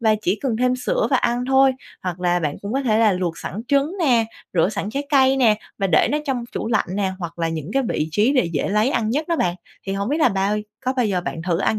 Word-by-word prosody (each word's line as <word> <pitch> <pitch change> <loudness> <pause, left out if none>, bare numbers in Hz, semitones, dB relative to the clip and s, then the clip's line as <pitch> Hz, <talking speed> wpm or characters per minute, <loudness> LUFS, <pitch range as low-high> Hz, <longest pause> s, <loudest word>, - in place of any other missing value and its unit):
và 220 -2 +3
chỉ 195 +3 0
cần 245 -5 0
thêm 250 +1 +1
sữa - - 0
và - - +4
ăn 240 +1 0
thôi, 265 0 +5 0.3
hoặc 180 -1 -4
là 175 -1 +2
bạn 150 -2 -2
cũng 200 +3 -4
có 275 - 0
thể 220 -4 +2
là 220 -3 +4
luộc 180 -2 -2
sẵn 210 - -5
trứng 280 +4 +2
nè, 245 -9 +3 0.3
rửa 175 0 +3
sẵn 205 0 -4
trái 280 +4 -3
cây 265 -1 +4
nè, 230 -5 +4 0.2
và 195 - +1
để 165 -4 +3
nó 300 - +2
trong 255 -4 -1
chủ - - -3
lạnh 220 - +1
nè, 195 -2 0
hoặc 170 -1 -7
là 165 -1 0
những 160 +1 -5
cái 270 - +2
vị 155 - -1
trí 210 - +2
để 260 - +3
dễ 145 - -1
lấy 210 +6 +2
ăn 225 -4 0
nhất 300 +6 -1
đó 335 - +1
bạn. 175 -8 0 0.3
Thì 195 - -2
hổng 200 +2 -2
biết 295 +4 0
là 300 - +5
bao 195 +1 0 0.3
có 255 - +1
bao 245 -3 +2
giờ 185 -3 0
bạn 165 -2 -5
thử 170 -1 0
ăn 215 +2 +1
215 Hz, 280 wpm, -21 LUFS, 185-265 Hz, 0.3 s, thôi